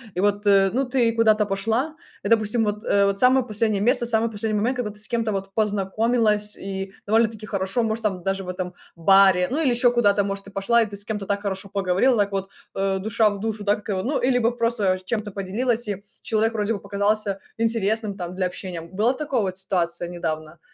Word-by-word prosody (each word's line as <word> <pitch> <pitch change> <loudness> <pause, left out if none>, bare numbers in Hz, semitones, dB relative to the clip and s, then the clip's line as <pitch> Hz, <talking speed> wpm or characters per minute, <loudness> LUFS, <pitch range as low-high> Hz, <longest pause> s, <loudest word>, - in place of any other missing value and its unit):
и 180 - 0
вот, 205 +1 +1
э, 195 -1 +5
ну, 270 +3 +1
ты 245 -2 +2
куда-то 220 -2 +3
пошла. 225 +10 -1 0.3
И, 200 - -2
допустим, 225 0 +3
вот, 210 0 -2
э, 200 0 +3
вот 200 0 0
самое 255 +1 +4
последнее 215 -2 0
место, 240 +2 +2
самый 230 -1 +1
последний 215 0 -2
момент, 240 +5 0
когда 230 -4 -2
ты 210 - -13
с 215 - -4
кем-то 230 -3 0
вот 195 0 -4
познакомилась, 210 +1 +1
и 195 0 -6
довольно-таки 220 0 +1
хорошо, 195 +3 -1
может, 225 0 -2
там, 190 -4 -1
даже 195 0 -2
в - - -7
этом 180 0 -4 0.2
баре, 185 +1 +5
ну, 300 +5 0
или 290 - +3
еще 245 0 +3
куда-то, 205 -4 +3
может, 195 0 -4
ты 200 - -12
пошла, 215 +5 +2
и - - +2
ты 205 -1 -8
с 200 - -7
кем-то 205 -1 -4
так 200 +1 -1
хорошо 195 -1 -4
поговорила, 195 +5 +2
так, 200 -1 +1
вот, 195 0 -2 0.3
э, 195 0 0
душа 220 +2 +2
в 200 -1 -6
душу, 215 -1 -3
да, 205 0 +3
как 210 +1 -12
его, 190 -2 -1
ну, 275 +4 0
или 250 0 +2
бы 235 0 +1
просто 230 -6 +1
чем-то 210 0 -3
поделилась, 220 +5 -1
и 200 0 -5 0.2
человек 225 +1 +1
вроде 215 0 0
бы - - -6
показался 200 0 0 0.2
интересным, 220 -2 0
там, 180 -2 -6
для 185 0 0
общения. 180 -1 -6
Была 200 +9 0
такая 270 -3 -1
вот 185 -2 -2
ситуация 190 -1 0 0.3
недавно 160 -2 -5
205 Hz, 220 wpm, -23 LUFS, 195-230 Hz, 0.3 s, э